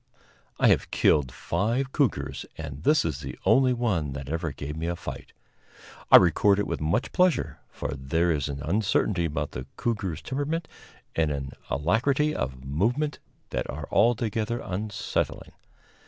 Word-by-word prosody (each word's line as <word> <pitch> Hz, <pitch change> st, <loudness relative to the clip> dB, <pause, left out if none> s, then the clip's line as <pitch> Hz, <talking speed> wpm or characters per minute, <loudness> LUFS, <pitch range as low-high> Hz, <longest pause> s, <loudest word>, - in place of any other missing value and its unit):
I -, -, +5 dB
have -, -, +2 dB
killed 70 Hz, -5 st, +3 dB
five 120 Hz, -, -1 dB
cougars, 140 Hz, -7 st, 0 dB
and 75 Hz, -3 st, -6 dB
this 150 Hz, -, +3 dB
is 75 Hz, -4 st, -2 dB
the 65 Hz, -3 st, -7 dB
only 130 Hz, -1 st, +5 dB
one 100 Hz, -, 0 dB
that 70 Hz, 0 st, -6 dB
ever 80 Hz, 0 st, -2 dB
gave 75 Hz, +2 st, -6 dB
me 80 Hz, +1 st, -3 dB
a 85 Hz, -, -1 dB
fight. -, -, -8 dB, 0.8 s
I -, -, +13 dB
record 95 Hz, +3 st, +4 dB
it 105 Hz, -, 0 dB
with -, -, -3 dB
much 85 Hz, +10 st, 0 dB
pleasure, 180 Hz, -2 st, +2 dB
for -, -, -4 dB
there 80 Hz, +6 st, +1 dB
is 75 Hz, -2 st, -1 dB
an 70 Hz, 0 st, -5 dB
uncertainty 95 Hz, +1 st, +1 dB
about 75 Hz, -, -2 dB
the 65 Hz, +2 st, -6 dB
cougar's 100 Hz, -9 st, -2 dB
temperament 150 Hz, +5 st, -2 dB, 0.5 s
and 80 Hz, -2 st, +2 dB
an 70 Hz, -2 st, -3 dB, 0.2 s
alacrity 130 Hz, -, +2 dB
of 65 Hz, -, -4 dB
movement 120 Hz, -, 0 dB, 0.3 s
that -, -, -2 dB
are -, -, -5 dB
altogether 115 Hz, 0 st, +2 dB
unsettling. 100 Hz, +2 st, -3 dB
90 Hz, 155 wpm, -27 LUFS, 75-120 Hz, 0.8 s, I